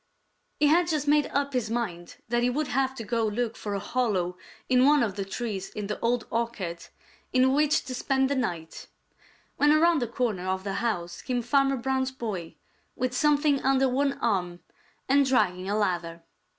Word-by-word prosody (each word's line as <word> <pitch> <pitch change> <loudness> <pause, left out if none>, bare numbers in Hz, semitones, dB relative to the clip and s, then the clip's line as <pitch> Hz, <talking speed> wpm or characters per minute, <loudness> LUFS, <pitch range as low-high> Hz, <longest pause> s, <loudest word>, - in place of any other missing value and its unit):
He 300 - +4
had 335 +4 +4
just 305 -4 -1
made 295 0 +4
up 280 0 -1
his 245 -4 -1
mind 190 -8 -4
that 240 +1 +1
he 245 - +2
would 290 +4 -2
have 265 0 0
to 230 - -6
go 230 +1 -1
look 225 +2 -1
for 205 -1 -4
a - - -1
hollow 200 -5 -1 0.3
in 255 0 +4
one 290 0 +5
of 205 -5 -2
the 200 - -2
trees 195 -1 -4
in 210 - -5
the 210 +1 -4
Old 235 0 0
Orchard 220 -8 -3 0.4
in 260 +1 +4
which 300 +1 +2
to 260 - -6
spend 265 +1 +1
the 280 - -1
night, 175 -11 -4 0.7
when 295 0 +4
around 320 0 +4
the 240 - -1
corner 220 -6 -2
of 190 0 -1
the 195 -1 -3
house 175 -7 -2
came 245 -2 -2
Farmer 275 +2 +2
Brown's 260 +1 0
boy 210 -10 -5 0.4
with 255 0 -2
something 290 -1 +3
under 270 0 +3
one 275 +2 +1
arm 190 -10 -1 0.5
and 280 +1 +4
dragging 195 -8 +1
a 205 - 0
ladder. 170 -5 -2
240 Hz, 190 wpm, -27 LUFS, 200-270 Hz, 0.7 s, one